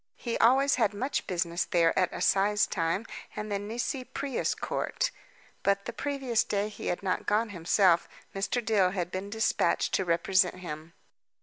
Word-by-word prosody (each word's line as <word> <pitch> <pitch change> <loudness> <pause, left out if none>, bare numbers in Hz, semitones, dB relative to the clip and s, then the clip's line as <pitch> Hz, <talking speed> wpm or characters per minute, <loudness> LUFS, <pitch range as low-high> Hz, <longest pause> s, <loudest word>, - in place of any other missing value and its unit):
He 235 -2 -3
always 270 +4 +4
had 210 -2 +2
much 260 +7 -2
business 170 -1 0
there 165 -2 +2
at 185 -1 +2
assize 205 +1 +2
time 165 +4 -1 0.3
and 210 0 -5
the 200 - 0
Nisi 235 +5 -3
Prius 275 +1 -2
Court; - - -2 0.5
but 200 0 +1
the 235 - -5
previous 270 -3 0
day 205 +1 -1
he 210 - -7
had 180 - -2
not 185 -1 -1
gone 220 +2 +2
himself, 180 -1 +3 0.2
Mr. 210 +4 -1
Dill 200 -5 +3
had 180 -2 -3
been 190 +2 -4
dispatched 220 +1 +1
to 190 - +2
represent 180 +2 +2
him. 165 -2 -8
200 Hz, 165 wpm, -29 LUFS, 180-230 Hz, 0.5 s, always